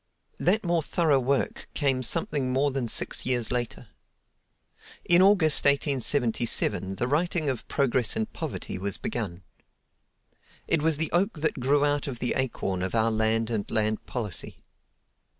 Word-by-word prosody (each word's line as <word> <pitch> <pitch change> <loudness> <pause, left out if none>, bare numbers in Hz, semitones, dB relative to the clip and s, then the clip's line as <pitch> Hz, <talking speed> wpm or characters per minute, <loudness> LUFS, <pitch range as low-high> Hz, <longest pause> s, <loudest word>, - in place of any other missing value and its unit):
That 205 +5 +2
more 170 -1 +1
thorough 155 -3 +2
work 135 +2 -1
came 135 -3 +1
something 130 +2 0
more 140 +2 +1
than 130 -3 -2
six - - 0
years 120 -3 0
later. 120 -1 -3 1.2
In 175 +1 +5
August, 185 -6 +5
1877, 125 -8 +1
the 120 +6 -2
writing 155 +1 0
of 125 - -7
"Progress 130 -4 +1
and 110 - -3
Poverty" 90 - -5
was 100 0 -2
begun. 95 -6 -4 1.2
It 165 - +1
was 160 -1 +1
the 160 +1 -2
oak 180 -2 0
that 155 - -1
grew 140 +3 +2
out 145 0 0
of 130 -3 -4
the 125 0 -1
acorn 105 -8 -2
of 95 +4 -2
"Our 115 0 +3
Land 110 +1 0
and 105 -3 -2
Land 110 -1 -1
Policy." 110 -7 -2
130 Hz, 150 wpm, -26 LUFS, 115-150 Hz, 1.2 s, In